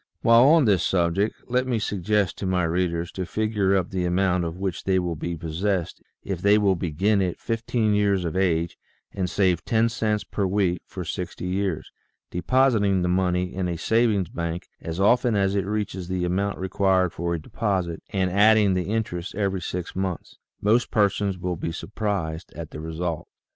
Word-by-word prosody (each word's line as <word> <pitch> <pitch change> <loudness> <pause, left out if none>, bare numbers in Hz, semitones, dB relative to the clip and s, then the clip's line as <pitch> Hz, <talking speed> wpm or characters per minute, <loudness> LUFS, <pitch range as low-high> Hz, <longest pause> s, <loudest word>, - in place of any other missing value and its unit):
While 115 +2 +7
on 155 0 +6
this 100 -6 +3
subject 95 +3 +1
let 125 +1 0
me 125 -2 +1
suggest 105 -2 0
to 95 - -2
my 90 -1 +1
readers 85 0 -1
to 95 - -4
figure 105 0 0
up 95 -2 0
the 95 -2 -1
amount 90 0 +1
of 85 +1 -5
which 95 -2 -3
they 95 -1 +2
will 90 -2 -1
be 85 +2 -4
possessed 85 +3 -2 0.2
if 95 -3 -4
they 100 +2 +5
will 100 -3 +3
begin 95 +5 +1
at 90 -2 -1
fifteen 115 -1 0
years 100 -3 +2
of 85 - -3
age 85 -3 0 0.3
and 95 -2 -2
save 90 -3 +1
ten 115 0 +2
cents 110 -2 -1
per 100 -2 -2
week 95 -3 0
for - - -6
sixty - - -5
years, 95 -2 -2 0.4
depositing 105 -2 +2
the 90 - +1
money 90 0 0
in 95 -1 -2
a 85 -1 -2
savings 110 -1 +2
bank 85 0 -4
as 80 +2 -5
often 120 +3 +3
as 100 -1 +2
it 100 -1 -1
reaches 100 -4 -3
the 90 -1 -1
amount 100 +3 -1
required 95 -1 +1
for 85 +1 -2
a - - -4
deposit, 90 -1 -2
and 95 -3 0
adding 105 0 +5
the 90 -1 0
interest 95 -6 -3
every 95 -2 -1
six 90 +1 -5
months. 95 -4 -4 0.2
Most 110 +3 +2
persons 100 -2 +1
will 90 -1 -3
be 80 - -3
suprised 95 -4 -3
at 80 -2 -7
the - - -7
result. 80 +1 -4
95 Hz, 185 wpm, -24 LUFS, 90-105 Hz, 0.4 s, While